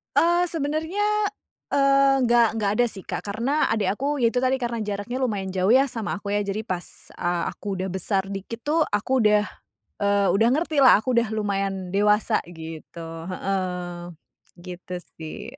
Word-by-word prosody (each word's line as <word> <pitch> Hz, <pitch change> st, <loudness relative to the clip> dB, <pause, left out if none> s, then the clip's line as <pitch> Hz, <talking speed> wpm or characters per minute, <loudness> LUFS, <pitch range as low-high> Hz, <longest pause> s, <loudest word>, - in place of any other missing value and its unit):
Eee, 345 Hz, +1 st, +4 dB
sebenarnya, 320 Hz, +6 st, -1 dB, 0.6 s
eee, 275 Hz, -1 st, +4 dB
nggak 235 Hz, -1 st, +5 dB
nggak 200 Hz, -1 st, +1 dB
ada 245 Hz, -, +4 dB
sih, 200 Hz, -, -7 dB
Kak, -, -, -5 dB
karena 235 Hz, +10 st, 0 dB
adik 205 Hz, -3 st, +1 dB
aku, 285 Hz, +3 st, -1 dB
ya 235 Hz, -, +4 dB
itu 245 Hz, +2 st, 0 dB
tadi 265 Hz, +1 st, +2 dB
karena 235 Hz, -2 st, -2 dB
jaraknya 205 Hz, +4 st, -4 dB
lumayan 205 Hz, -6 st, -1 dB
jauh 190 Hz, +3 st, +2 dB
ya 270 Hz, +2 st, +5 dB
sama 225 Hz, -4 st, -4 dB
aku 205 Hz, 0 st, -3 dB
ya, 205 Hz, -, +1 dB
jadi 205 Hz, +3 st, -4 dB
pas, 180 Hz, -1 st, -2 dB, 0.3 s
eee, 175 Hz, -1 st, -1 dB
aku 195 Hz, -2 st, -5 dB
sudah 190 Hz, -, -1 dB
besar 190 Hz, +1 st, -1 dB
dikit 200 Hz, +4 st, -6 dB
tuh, 310 Hz, +5 st, +1 dB
aku 225 Hz, +4 st, +1 dB
udah, 210 Hz, 0 st, +4 dB, 0.5 s
eee, 200 Hz, -1 st, +3 dB
udah 225 Hz, +4 st, +4 dB
ngertilah 285 Hz, -4 st, +5 dB
aku 235 Hz, +4 st, -2 dB
udah 235 Hz, -2 st, +2 dB
lumayan 195 Hz, -3 st, -2 dB
dewasa 210 Hz, +2 st, +3 dB
gitu. 165 Hz, 0 st, -9 dB, 0.2 s
Heeh, 180 Hz, -2 st, -3 dB, 0.6 s
gitu 180 Hz, 0 st, -7 dB, 0.2 s
sih. 160 Hz, -1 st, -8 dB
210 Hz, 165 wpm, -24 LUFS, 195-255 Hz, 0.6 s, nggak